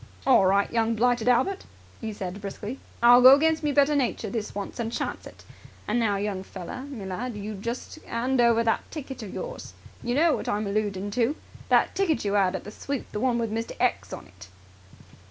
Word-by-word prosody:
"All 240 -8 +5
right, 200 +1 +2
young 230 0 +1
blighted 240 0 +1
Albert," 260 +11 +2 0.3
he 225 -1 -4
said 200 -2 -6
briskly. 205 +5 -6 0.2
"I'll 245 +1 +8
go 260 +2 +10
against 315 +2 +1
my 295 - +1
better 285 +1 +3
nature 240 -6 -1
this 215 -3 -4
once 200 +4 -6
and 230 -1 -2
chance - - -4
it. - - -15 0.4
And 220 +3 +1
now, 215 -3 +1
young 200 -1 -2
feller 190 +6 -8
me 260 -9 -7
lad, 215 +5 -4
you 210 +1 -5
just 235 +9 -6
'and 245 +2 0
over 230 -1 +4
that 225 -1 0
ticket 275 -5 -7
of 205 -4 -7
yours! - - -7 0.3
You 240 0 -2
know 315 +1 +4
what - - -4
I'm 210 +1 -1
alloodin' 205 -1 -2
to! 245 +5 +1 0.3
That - - +3
ticket 325 - 0
you 200 0 0
'ad 190 -2 +2
at - - -5
the 210 - -9
sweep, 275 +4 -5
the 210 - -3
one 245 0 +1
with 230 -2 -2
'Mr. 225 +1 -3
X' 100 0 0
on - - -7
it." 95 +1 -15
230 Hz, 210 wpm, -26 LUFS, 205-255 Hz, 0.4 s, go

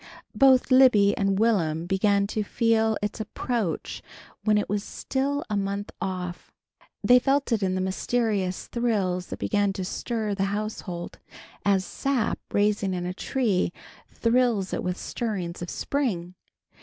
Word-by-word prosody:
Both 265 -1 +5
Libby 245 -6 +6
and 195 -1 +1
Will'm 170 -8 +1
began 200 +2 +2
to 215 +1 -2
feel 225 0 +2
its 205 +2 -3
approach 220 -3 -3 0.4
when 215 -1 +3
it 210 - 0
was 205 0 -1
still 280 +2 -2
a 210 - -2
month 200 0 -2
off. 180 -2 -4 0.5
They 250 0 +7
felt 275 +1 +1
it 225 -2 +2
in 185 -1 0
the 185 - -1
mysterious 190 -1 -1
thrills 200 -7 -1
that - - -6
began 205 -2 +1
to 190 -1 -4
stir 220 +1 -2
the 195 -1 0
household 200 -4 -4 0.4
as 195 -2 +2
sap, 270 -5 -1
rising 205 -2 +1
in 175 0 -3
a 180 - -3
tree, 205 -4 0 0.4
thrills 230 -5 +1
it - - -1
with 180 0 -2
stirrings 190 -8 -4
of 175 - -5
spring. 195 -12 -2
205 Hz, 145 wpm, -26 LUFS, 185-230 Hz, 0.5 s, They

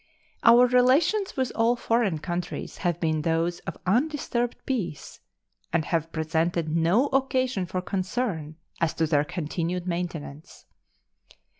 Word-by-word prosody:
Our 235 +2 +8
relations 275 - +3
with 260 -1 0
all 230 +1 +2
foreign 230 -7 +1
countries 175 +2 -5
have 175 -3 -1
been 155 -2 0
those 165 +2 0
of - - -8
undisturbed 245 +1 0
peace, 185 - -4 0.5
and 160 -2 +1
have 165 -1 -1
presented 160 0 -1
no 170 +10 +3
occasion 260 -7 0
for 180 +1 -3
concern 185 -5 -2 0.2
as 165 - 0
to 165 - +1
their 150 -2 +2
continued 170 +2 -3
maintenance. 170 -4 -5
180 Hz, 125 wpm, -26 LUFS, 165-240 Hz, 0.5 s, Our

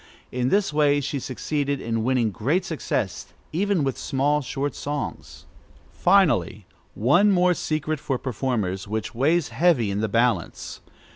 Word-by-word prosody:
In 125 0 0
this 200 -3 +1
way 145 -1 +3
she 140 0 -3
succeeded 140 +2 -2
in 115 -2 -2
winning 120 -3 +1
great 140 - 0
success, 110 - -3 0.2
even 195 -1 +1
with 135 -2 -2
small, 145 +2 +1
short 140 0 -3
songs. 145 +2 -5 0.5
Finally, 155 - +2 0.3
one 175 - +4
more 180 -2 +4
secret 155 -2 -2
for 135 -2 -2
performers, 110 -7 -2
which 110 +1 -3
weighs 150 +6 +1
heavy 150 - +2
in 100 +1 -2
the 110 - -1
balance. 115 -5 -1
135 Hz, 140 wpm, -24 LUFS, 115-155 Hz, 0.5 s, one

